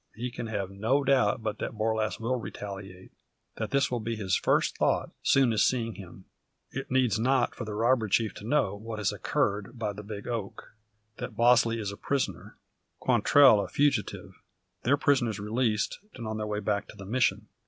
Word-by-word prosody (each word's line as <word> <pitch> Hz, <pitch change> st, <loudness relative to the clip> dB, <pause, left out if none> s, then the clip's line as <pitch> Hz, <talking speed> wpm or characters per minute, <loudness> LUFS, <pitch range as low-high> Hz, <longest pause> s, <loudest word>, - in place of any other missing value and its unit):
He 120 Hz, +2 st, -4 dB
can 120 Hz, -1 st, -5 dB
have 100 Hz, -3 st, -3 dB
no 115 Hz, +9 st, +1 dB
doubt 125 Hz, -5 st, +2 dB
but 110 Hz, -1 st, -3 dB
that -, -, -4 dB
Borlasse 110 Hz, 0 st, 0 dB
will 120 Hz, +3 st, -1 dB
retaliate; 95 Hz, -4 st, -8 dB, 0.5 s
that 110 Hz, -, -3 dB
this 140 Hz, -1 st, +1 dB
will 120 Hz, -, 0 dB
be 115 Hz, +1 st, -3 dB
his 95 Hz, -4 st, 0 dB
first -, -, +1 dB
thought, -, -, +1 dB
soon 130 Hz, -4 st, +4 dB
as 105 Hz, -, +3 dB
seeing 115 Hz, -3 st, +1 dB
him. 95 Hz, -1 st, -12 dB, 0.5 s
It -, -, -5 dB
needs 125 Hz, -4 st, +2 dB
not 130 Hz, +1 st, +2 dB
for 115 Hz, -, -6 dB
the 105 Hz, -1 st, -5 dB
robber 115 Hz, +1 st, +2 dB
chief 110 Hz, +2 st, +1 dB
to -, -, -10 dB
know 110 Hz, -4 st, +1 dB
what 110 Hz, +2 st, -7 dB
has 105 Hz, -3 st, 0 dB
occurred 105 Hz, +4 st, -1 dB
by 105 Hz, -3 st, -2 dB
the 105 Hz, -, -8 dB
big 105 Hz, -1 st, -8 dB
oak; 115 Hz, -5 st, -5 dB, 0.4 s
that 115 Hz, -, -6 dB
Bosley 120 Hz, -1 st, +4 dB
is 100 Hz, -2 st, -3 dB
a 100 Hz, -, -9 dB
prisoner, 140 Hz, -2 st, -3 dB, 0.4 s
Quantrell 135 Hz, -8 st, +5 dB
a -, -, -5 dB
fugitive, 140 Hz, -6 st, -1 dB, 0.4 s
their 140 Hz, +4 st, +3 dB
prisoners 130 Hz, -8 st, +1 dB
released, 110 Hz, +1 st, 0 dB, 0.2 s
and 120 Hz, -, -7 dB
on 110 Hz, 0 st, -3 dB
their 105 Hz, 0 st, -3 dB
way 105 Hz, 0 st, -2 dB
back 100 Hz, 0 st, -1 dB
to -, -, -12 dB
the 100 Hz, -1 st, -10 dB
Mission. 120 Hz, +5 st, +1 dB
110 Hz, 190 wpm, -28 LUFS, 105-125 Hz, 0.5 s, Quantrell